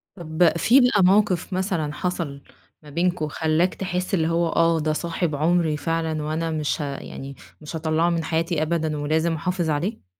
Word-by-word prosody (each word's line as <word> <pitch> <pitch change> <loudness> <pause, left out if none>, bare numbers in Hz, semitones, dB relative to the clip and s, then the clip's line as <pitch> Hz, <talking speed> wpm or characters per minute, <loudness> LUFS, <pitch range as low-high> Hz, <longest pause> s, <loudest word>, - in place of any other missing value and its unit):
طب 170 -1 +1
في 240 +10 +5
بقى 245 -6 +4
موقف 190 -1 +3
مثلًا 180 -5 -1
حصل 165 -5 -3 0.4
ما 150 - -13
بينكم، 170 +1 0
خلّاك 160 +4 0
تحس 185 +1 -3
اللي 160 -4 +2
هو 170 +1 +1
آه 165 0 +2
ده 155 0 0
صاحب 165 0 -2
عمري 160 0 +1
فعلًا، 160 0 -2
وأنا 160 +2 -2
مش 155 0 -1
ه - - -1
يعني 135 0 -8 0.3
مش 150 +2 -7
هاطلّعه 160 +1 +1
من 170 -1 0
حياتي 165 0 -1
أبدًا، 160 -1 -1
ولازم 160 +3 0
أحافظ 175 +1 -1
عليه؟ 155 - -2
165 Hz, 170 wpm, -23 LUFS, 155-180 Hz, 0.4 s, في